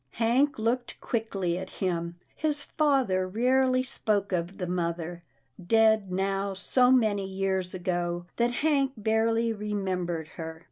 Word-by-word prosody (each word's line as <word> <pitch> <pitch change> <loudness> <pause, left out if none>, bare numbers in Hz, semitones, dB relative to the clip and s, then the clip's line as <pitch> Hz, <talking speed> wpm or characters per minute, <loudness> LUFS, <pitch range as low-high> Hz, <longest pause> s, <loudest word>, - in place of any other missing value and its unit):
Hank 245 +5 +2
looked 235 +3 -1
quickly 195 -7 -2
at 190 0 -7
him. 170 -2 -2 0.2
His 300 -2 0
father 265 - +1
rarely 255 +5 +2
spoke 210 -6 0
of 180 +1 -2
the 180 - -3
mother, 170 -1 -3 0.4
dead 220 0 +3
now 195 +1 -1
so 250 +6 +3
many 215 -6 +2
years 190 -1 -1
ago 175 -1 -2
that 235 0 +3 0.2
Hank 275 -3 +2
barely 225 +1 +1
remembered 185 -6 -3
her. 160 -1 -7
200 Hz, 130 wpm, -28 LUFS, 180-235 Hz, 0.4 s, dead